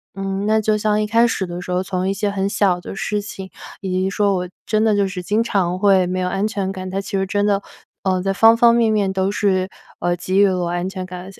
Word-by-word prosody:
嗯， 195 Hz, 0 st, -3 dB
那 220 Hz, 0 st, +3 dB
就 215 Hz, 0 st, +1 dB
像 210 Hz, 0 st, +1 dB
一 210 Hz, -, -1 dB
开 230 Hz, +2 st, +4 dB
始 195 Hz, -4 st, -2 dB
的 175 Hz, 0 st, -6 dB
时 180 Hz, -, -6 dB
候， 180 Hz, +1 st, +1 dB
从 185 Hz, 0 st, -2 dB
一 -, -, +1 dB
些 205 Hz, +1 st, -1 dB
很 195 Hz, 0 st, -1 dB
小 185 Hz, -4 st, +1 dB
的 -, -, -7 dB
事 210 Hz, +1 st, -2 dB
情， 195 Hz, -2 st, -8 dB, 0.3 s
以 190 Hz, -, -5 dB
及 185 Hz, +1 st, 0 dB
说 200 Hz, 0 st, +1 dB
我 180 Hz, -1 st, -3 dB, 0.2 s
真 215 Hz, 0 st, +1 dB
的 220 Hz, -1 st, +3 dB
就 200 Hz, -1 st, +2 dB
是 190 Hz, -1 st, -5 dB
经 215 Hz, +5 st, +1 dB
常 185 Hz, -5 st, 0 dB
会 190 Hz, -2 st, +4 dB
没 185 Hz, +1 st, -2 dB
有 180 Hz, -, -1 dB
安 195 Hz, +2 st, -1 dB
全 195 Hz, -3 st, -2 dB
感， 185 Hz, -1 st, -6 dB
他 195 Hz, +1 st, -2 dB
其 195 Hz, -, -7 dB
实 190 Hz, -, 0 dB
真 205 Hz, +1 st, 0 dB
的， 200 Hz, -1 st, +1 dB, 0.4 s
嗯， 185 Hz, -1 st, +1 dB
在 195 Hz, +1 st, 0 dB
方 225 Hz, +3 st, +6 dB
方 235 Hz, 0 st, +5 dB
面 230 Hz, -2 st, +3 dB
面 200 Hz, -3 st, +1 dB
都 190 Hz, +1 st, 0 dB
是， 190 Hz, -2 st, 0 dB, 0.3 s
呃， 175 Hz, 0 st, 0 dB
给 185 Hz, +3 st, 0 dB
予 205 Hz, -, +6 dB
了 185 Hz, -1 st, 0 dB
我 175 Hz, -, -1 dB
安 175 Hz, +2 st, -2 dB
全 185 Hz, -1 st, -6 dB
感。 180 Hz, 0 st, -8 dB
而 190 Hz, -, -10 dB
且 -, -, -18 dB
195 Hz, 300 characters per minute, -20 LUFS, 185-205 Hz, 0.4 s, 方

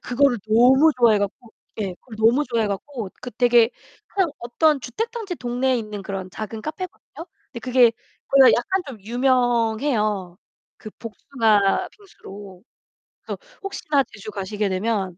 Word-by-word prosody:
그거를 250 Hz, 0 st, +2 dB
너무 255 Hz, +8 st, +6 dB
좋아해 230 Hz, -3 st, +5 dB
갖고 215 Hz, +3 st, -5 dB, 0.3 s
예. 195 Hz, -3 st, -3 dB
그걸 225 Hz, -4 st, -12 dB
너무 235 Hz, +7 st, +4 dB
좋아해 230 Hz, -4 st, 0 dB
갖고 215 Hz, +3 st, -5 dB
그 250 Hz, -, -7 dB
되게 240 Hz, 0 st, +4 dB, 0.4 s
한 385 Hz, -4 st, +1 dB
어떤 280 Hz, +5 st, +1 dB
주택 255 Hz, -, -4 dB
단지 445 Hz, -6 st, -5 dB
동네에 255 Hz, -1 st, 0 dB
있는 210 Hz, -2 st, -6 dB
그런 190 Hz, -1 st, -5 dB
작은 215 Hz, +2 st, -6 dB
카페거든요. 330 Hz, -, -8 dB, 0.3 s
근데 235 Hz, -, -7 dB
그게 245 Hz, -1 st, +4 dB, 0.4 s
거기가 275 Hz, -1 st, +7 dB
약간 370 Hz, +11 st, 0 dB
좀 250 Hz, -6 st, -9 dB
유명해요, 230 Hz, -4 st, 0 dB, 0.4 s
그 215 Hz, -, -10 dB
복숭아 225 Hz, -, +1 dB
빙수로. 200 Hz, -, -13 dB, 0.6 s
그래서 -, -, -6 dB, 0.2 s
혹시나 310 Hz, -8 st, 0 dB
제주 210 Hz, -3 st, -10 dB
가시게 205 Hz, +1 st, -3 dB
되면 190 Hz, -2 st, -2 dB
235 Hz, 310 characters per minute, -22 LUFS, 210-270 Hz, 0.6 s, 거기가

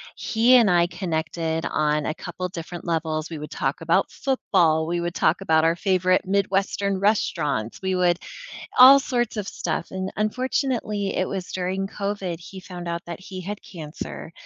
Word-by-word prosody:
He 235 Hz, +3 st, +3 dB
and 230 Hz, -4 st, +5 dB
I 175 Hz, -1 st, +4 dB
connected 165 Hz, -2 st, -2 dB
on 150 Hz, -1 st, 0 dB
a -, -, -1 dB
couple 180 Hz, +2 st, -5 dB
different 170 Hz, 0 st, -7 dB
levels, 160 Hz, -2 st, -1 dB
we 160 Hz, -, -6 dB
would 150 Hz, -, -8 dB
talk -, -, -2 dB
about -, -, +2 dB
football, 170 Hz, -, +1 dB
we 175 Hz, 0 st, -1 dB
would 175 Hz, +1 st, -3 dB
talk -, -, +2 dB
about 160 Hz, -4 st, +3 dB
our 165 Hz, +1 st, +3 dB
favorite 185 Hz, 0 st, +2 dB
Midwestern 195 Hz, 0 st, 0 dB
restaurants, 150 Hz, -, 0 dB
we 190 Hz, -1 st, 0 dB
would 175 Hz, -1 st, +2 dB, 0.6 s
all 265 Hz, +2 st, +10 dB
sorts 240 Hz, -4 st, -1 dB
of 205 Hz, -2 st, -3 dB
stuff, 170 Hz, 0 st, -3 dB
and 190 Hz, 0 st, -4 dB
unfortunately, 215 Hz, -2 st, -1 dB
it 185 Hz, -, 0 dB
was 190 Hz, -2 st, -5 dB
during 190 Hz, +1 st, -2 dB
COVID 200 Hz, -4 st, -3 dB
he 190 Hz, +3 st, -10 dB
found 180 Hz, -2 st, -8 dB
out 170 Hz, 0 st, -3 dB
that 170 Hz, 0 st, -7 dB
he 185 Hz, 0 st, -8 dB
had 200 Hz, +3 st, -5 dB
cancer, 160 Hz, -1 st, -8 dB
185 Hz, 170 wpm, -24 LUFS, 165-200 Hz, 0.6 s, all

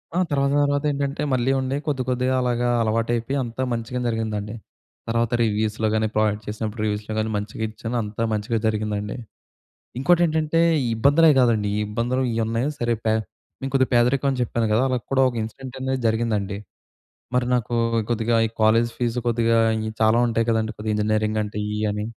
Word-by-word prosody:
ఆ! -, -, +1 dB
తర్వాత, 140 Hz, -1 st, +2 dB
తర్వాతేంటంటే 145 Hz, -1 st, 0 dB
మళ్ళీ 130 Hz, +1 st, +2 dB
ఉండే 130 Hz, +1 st, -1 dB
కొద్దికొద్దిగా 130 Hz, -2 st, 0 dB
అలాగా 120 Hz, -1 st, 0 dB
అలవాటైపోయి 115 Hz, +4 st, 0 dB
అంతా 120 Hz, +1 st, -5 dB
మంచిగనే 120 Hz, +2 st, -3 dB
జరిగిందండి. 110 Hz, -1 st, -3 dB, 0.5 s
తర్వాత 115 Hz, 0 st, 0 dB
రివ్యూస్‌లో 110 Hz, 0 st, 0 dB
కాని 110 Hz, 0 st, +1 dB
ప్రాజెక్ట్ 105 Hz, 0 st, +1 dB
చేసినప్పుడు 110 Hz, +1 st, -4 dB
రివ్యూస్‌లో 105 Hz, +1 st, -3 dB
గాని 110 Hz, 0 st, -1 dB
మంచిగా 105 Hz, +2 st, -5 dB
ఇచ్చాను, 115 Hz, +2 st, -6 dB
అంతా 105 Hz, +2 st, -4 dB
మంచిగా 110 Hz, +2 st, -1 dB
జరిగిందండి. 105 Hz, -1 st, -2 dB, 0.8 s
ఇంకోటి 175 Hz, +5 st, +4 dB
ఏంటంటే 160 Hz, 0 st, 0 dB, 0.3 s
ఈ -, -, 0 dB
ఇబ్బందులే 145 Hz, +7 st, +5 dB
కాదండి 115 Hz, -4 st, +3 dB
ఈ -, -, 0 dB
ఇబ్బందులు 120 Hz, +4 st, -1 dB
ఇయున్నాయి 115 Hz, +4 st, 0 dB
సరే 120 Hz, 0 st, +1 dB
పే 110 Hz, -, +3 dB, 0.5 s
మేం 135 Hz, -, -3 dB
కొద్దిగా 130 Hz, -1 st, +3 dB
పేదరికం 125 Hz, +3 st, +3 dB
అని 130 Hz, -, -3 dB
చెప్పాను 115 Hz, -1 st, -1 dB
కదా! 120 Hz, +4 st, +3 dB
అలా 130 Hz, -, +1 dB
కూడా 135 Hz, 0 st, +3 dB
ఒక 120 Hz, -, -8 dB
ఇన్సిడెంటనేది 130 Hz, +3 st, -4 dB
జరిగిందండి. 110 Hz, -3 st, -1 dB, 0.8 s
మరి 125 Hz, -1 st, +2 dB
నాకు 120 Hz, -1 st, -1 dB, 0.4 s
కొద్దిగా 115 Hz, 0 st, +1 dB
ఈ -, -, -4 dB
కాలేజ్ 115 Hz, +2 st, +4 dB
ఫీస్ 120 Hz, 0 st, -1 dB
కొద్దిగా 115 Hz, 0 st, +2 dB, 0.4 s
చాలా 110 Hz, +1 st, +4 dB
ఉంటాయి 115 Hz, 0 st, 0 dB
కదండీ 110 Hz, -1 st, 0 dB
కొద్దిగా 110 Hz, 0 st, -3 dB
ఇంజినీరింగ్ 110 Hz, 0 st, 0 dB
అంటే 105 Hz, 0 st, -6 dB
ఇయి 105 Hz, -, -2 dB
అని. 105 Hz, 0 st, -3 dB
115 Hz, 160 wpm, -23 LUFS, 110-130 Hz, 0.8 s, ఇబ్బందులే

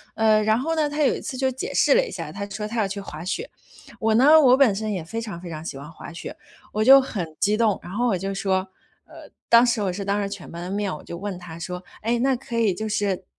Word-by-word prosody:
呃， 220 Hz, -1 st, +4 dB
然 220 Hz, +1 st, +3 dB
后 305 Hz, +7 st, -1 dB
呢， 305 Hz, -2 st, +1 dB
他 295 Hz, +1 st, 0 dB
有 -, -, +3 dB
一 -, -, -5 dB
次 290 Hz, -, -6 dB
就 260 Hz, 0 st, 0 dB
解 260 Hz, -, -5 dB
释 -, -, +4 dB
了 -, -, +4 dB
一 -, -, -7 dB
下， -, -, -6 dB
他 200 Hz, 0 st, -5 dB
说 210 Hz, +1 st, -5 dB
他 230 Hz, +2 st, -3 dB
要 205 Hz, -, +2 dB
去 200 Hz, +1 st, -5 dB
滑 160 Hz, -3 st, -8 dB
雪。 410 Hz, -, -3 dB, 0.5 s
我 220 Hz, 0 st, +2 dB
呢， 295 Hz, +6 st, +7 dB
我 255 Hz, -3 st, +6 dB
本 265 Hz, -7 st, +5 dB
身 215 Hz, +2 st, -3 dB
也 180 Hz, -4 st, -3 dB
非 225 Hz, +7 st, -5 dB
常 205 Hz, -6 st, -6 dB
非 180 Hz, -, -9 dB
常 155 Hz, -1 st, -6 dB
喜 140 Hz, -, -6 dB
欢 145 Hz, +4 st, -10 dB
滑 170 Hz, -, -10 dB
雪， 170 Hz, -, -8 dB, 0.4 s
我 215 Hz, +1 st, 0 dB
就 270 Hz, +3 st, +9 dB
很 180 Hz, -11 st, -4 dB
激 210 Hz, +1 st, +2 dB
动， 220 Hz, -4 st, +2 dB
然 175 Hz, -, -9 dB
后 240 Hz, +5 st, 0 dB
我 205 Hz, -6 st, +1 dB
就 195 Hz, +2 st, -3 dB
说 190 Hz, -1 st, 0 dB, 0.4 s
呃， -, -, -14 dB, 0.2 s
当 235 Hz, 0 st, +7 dB
时 240 Hz, -2 st, +1 dB
我 185 Hz, -2 st, -1 dB
是 200 Hz, +1 st, -4 dB
当 200 Hz, +1 st, 0 dB
着 200 Hz, -, -1 dB
全 200 Hz, -3 st, -8 dB
班 170 Hz, +1 st, -7 dB
的 180 Hz, -, -5 dB
面， 200 Hz, -1 st, -1 dB
我 -, -, -11 dB
就 170 Hz, -, -7 dB
问 195 Hz, 0 st, -5 dB
他 170 Hz, -2 st, -10 dB
说， 180 Hz, +1 st, -6 dB, 0.2 s
诶， 230 Hz, +3 st, 0 dB
那 265 Hz, +2 st, +2 dB
可 235 Hz, -1 st, -6 dB
以 220 Hz, -4 st, +3 dB
就 215 Hz, +4 st, -4 dB
是 200 Hz, -3 st, -1 dB
210 Hz, 300 characters per minute, -24 LUFS, 185-235 Hz, 0.5 s, 就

